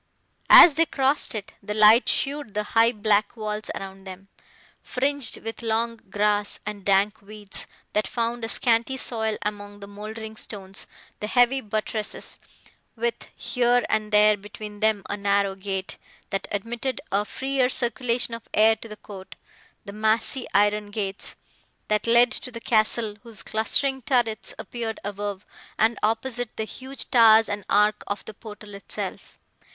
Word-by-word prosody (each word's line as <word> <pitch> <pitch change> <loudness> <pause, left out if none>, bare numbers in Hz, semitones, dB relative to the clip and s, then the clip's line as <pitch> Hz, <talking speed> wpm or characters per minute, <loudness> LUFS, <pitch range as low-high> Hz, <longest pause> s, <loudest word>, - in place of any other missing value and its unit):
As 340 - +11
they 325 +3 +3
crossed 270 -2 +1
it, 205 -2 -6
the 210 +1 -5
light 215 +3 +6
showed 275 -7 0
the 210 - 0
high 230 +1 +5
black 210 -1 +1
walls 215 -1 -4
around 195 0 -8
them, 190 +1 -10 0.5
fringed 275 -1 -1
with 225 +1 -6
long 230 0 -1
grass 205 0 +1
and 210 -1 -6
dank 200 +2 +2
weeds, 205 0 -8 0.3
that 210 -2 +1
found 235 0 -2
a 225 - -2
scanty 235 +3 +1
soil 220 -4 -1
among 205 -1 -5
the 200 - -9
mouldering 215 +2 -8
stones; 195 -3 -5 0.3
the 210 - -3
heavy 245 +3 +3
buttresses, 215 0 -4 0.6
with, 475 -1 -3
here 245 -1 +1
and 215 0 0
there, 210 0 +6
between 210 +1 -10
them, 215 -2 +2
a - - -2
narrow 200 -1 +1
grate, 190 -1 -4 0.3
that 195 0 -2
admitted 235 +6 -3
a 200 +2 +2
freer 265 +3 -1
circulation 240 -1 -1
of 230 0 -8
air 220 +1 +5
to 220 - -11
the 215 -1 -9
court, 195 -3 -11 0.5
the 200 - -8
massy 220 +4 0
iron 205 +1 +2
gates, 200 -2 -4 0.5
that 210 +1 +1
led 235 +1 +5
to 255 - -2
the 230 -2 -8
castle, 215 -1 +1
whose 230 -3 -6
clustering 265 +5 +1
turrets 240 -3 0
appeared 230 -2 -5
above, 205 -1 -4 0.3
and, 220 0 +2
opposite, 230 +2 -1
the 220 - -1
huge 260 +5 -6
towers 225 -2 +7
and 205 0 -4
arch 210 +1 +4
of 205 - -4
the 220 - -7
portal 210 -1 -11
itself. 200 - -7
215 Hz, 155 wpm, -25 LUFS, 205-235 Hz, 0.6 s, As